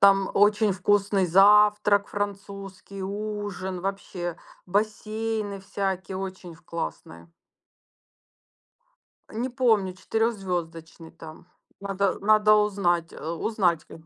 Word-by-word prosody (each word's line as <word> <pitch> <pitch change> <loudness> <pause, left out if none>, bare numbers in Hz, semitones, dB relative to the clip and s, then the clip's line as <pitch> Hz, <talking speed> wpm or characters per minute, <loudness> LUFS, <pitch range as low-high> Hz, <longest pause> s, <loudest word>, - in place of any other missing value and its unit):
Там 195 -1 +5
очень 210 +1 +4
вкусный 195 0 +2
завтрак 205 +2 +5
французский, 195 -1 -6
ужин, 205 -2 -4
вообще 180 -2 -4 0.3
бассейны 215 +1 -2
всякие, 190 -1 -3
очень 185 -2 -7
в 160 - -21
классные. 85 - -7 2.0
Не 235 +4 -3
помню 220 -7 +2
четырехзвездочный 180 -6 -3
там, 160 0 -12 0.3
надо, 200 -1 0
э, - - -10
надо 215 +1 +5
узнать, 190 -5 +1
а, 160 +2 -5
узнать 175 -5 0
к - - -17
195 Hz, 100 wpm, -26 LUFS, 180-210 Hz, 2.0 s, Там